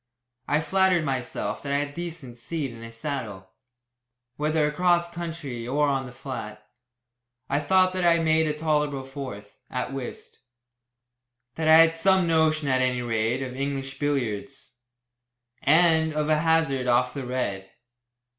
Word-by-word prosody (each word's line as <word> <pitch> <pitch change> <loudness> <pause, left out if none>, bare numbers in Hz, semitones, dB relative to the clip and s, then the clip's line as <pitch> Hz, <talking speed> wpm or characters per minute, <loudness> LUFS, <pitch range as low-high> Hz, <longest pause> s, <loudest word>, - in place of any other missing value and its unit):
I 150 +1 +2
flattered 185 -1 +2
myself 130 -3 -3
that 140 - -5
I 140 - +2
had 145 0 -1
a - - -15
decent 160 -8 -7
seat 145 +1 -4
in 115 - -12
a 115 0 -9
saddle, 115 -7 -6 0.8
whether 155 +1 +1
across 175 +3 +1
country 160 -9 -5
or 145 +3 +2
on 135 -2 -1
the - - -10
flat. 110 -5 -7 0.8
I 140 - +1
thought 185 +5 +3
that 185 -1 -2
I 170 -1 +5
made 160 -1 +2
a 150 - 0
tolerable 150 -3 0
fourth 130 -7 -8
at 125 +1 -3
whist; 135 -3 -7 1.1
that 160 +3 -2
I 160 - +8
had 165 0 +6
some 190 +2 +3
notion, 160 -2 +2
at 130 -1 +2
any 125 -1 0
rate, 115 +2 0
of 130 -1 -6
English 135 0 -4
billiards, 135 -3 -3 0.9
and 160 -2 +4
of 150 0 0
a 155 -1 +3
hazard 160 -5 +1
off 125 +1 +2
the 140 - -5
red. 100 -7 -3
145 Hz, 155 wpm, -25 LUFS, 125-160 Hz, 1.1 s, I